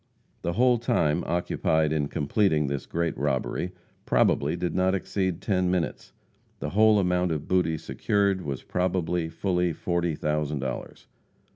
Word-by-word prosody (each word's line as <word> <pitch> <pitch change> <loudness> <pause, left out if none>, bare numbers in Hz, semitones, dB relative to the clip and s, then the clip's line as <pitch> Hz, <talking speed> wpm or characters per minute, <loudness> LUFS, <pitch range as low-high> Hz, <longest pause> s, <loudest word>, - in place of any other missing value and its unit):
The 85 - -1
whole 125 +3 +3
time 75 -9 +1
occupied 80 -2 +1
in 75 -2 0
completing 75 +2 +1
this 70 0 -3
great 85 -1 -1
robbery 70 +5 -1 0.4
probably - - +2
did 90 - -2
not 95 +1 +2
exceed 95 -2 -2
ten 90 -3 +1
minutes. 90 -2 -2 0.5
The - - -4
whole 110 +1 +5
amount 90 -2 +1
of 75 -2 -3
booty 90 -3 +2
secured 100 +3 0
was 70 -6 -5
probably 90 -2 -1
fully 90 -1 0
forty 85 0 -1
thousand 75 0 -1
dollars. 65 -2 -5
85 Hz, 140 wpm, -26 LUFS, 75-95 Hz, 0.5 s, whole